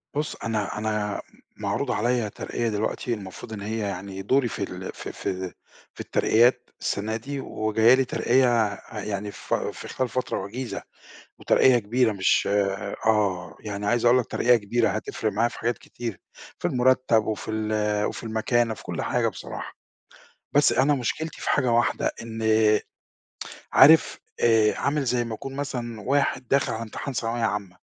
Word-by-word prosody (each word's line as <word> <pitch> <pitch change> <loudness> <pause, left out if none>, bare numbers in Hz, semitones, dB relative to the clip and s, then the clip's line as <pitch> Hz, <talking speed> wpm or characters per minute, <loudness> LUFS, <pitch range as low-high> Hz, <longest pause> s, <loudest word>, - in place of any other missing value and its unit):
بُصّ 150 +1 -2
أنا 110 -3 -2
أنا 105 -1 -2 0.4
معروض - - -1
عليَّ 120 -1 +1
ترقية 115 +3 -3
دلوقتي 110 +3 -2
المفروض 100 0 -8
إن 105 - -6
هي 110 +3 -3
يعني 100 -1 -4
دوري 130 +5 +2
في - - -4
ال - - -6
في - - -7
في 95 -1 -4 0.4
في - - -19
الترقيات 120 +2 +3
السنة 110 +2 -1
دي، 140 +5 -5
وجاية 110 -1 +3
لي 130 0 +3
ترقية 120 -4 +2 0.2
يعني 105 0 -3
في - - -2
في - - -9
خلال 130 -1 -2
فترة 130 +1 -2
وجيزة، 120 +5 -5 0.6
وترقية 125 -2 +4
كبيرة 115 +2 +1
مش 95 -2 +2 0.6
آه 95 -6 +1
يعني 105 -1 -5
عايز 120 +1 +1
أقول 120 +1 +6
لك 125 - -1
ترقية 125 0 +3
كبيرة 115 +2 +1
هتفرِق 110 0 -2
معايا 115 +4 +2
في - - -11
حاجات 120 +1 -1
كتير، 115 -7 -7 0.4
في - - -1
المُرتّب 125 -3 +3
وفي 110 0 -3
ال 105 -1 0
وفي - - -3
المكانة 115 +1 +1
في - - -13
كلّ - - -4
حاجة - - +1
بصراحة، - - -7 0.8
بس - - +5
أنا 135 +4 +3
مشكلتي 145 +5 -3
في - - -1
حاجة 130 -4 +2
واحدة، 120 0 +2
إن 115 -1 -6 1.3
عارف 155 +4 +7 0.2
آآ 110 -2 +4
عامل 145 0 0
زي 125 -1 +1
ما 115 -1 -5
يكون 135 +4 -7
مثلًا 120 -5 -4
واحد 135 0 0
داخل 140 +2 +2
على 110 - -4
امتحان 115 +4 -5
ثانوية 115 0 -2
عامّة، 100 -4 -2
115 Hz, 160 wpm, -25 LUFS, 105-125 Hz, 1.3 s, عارف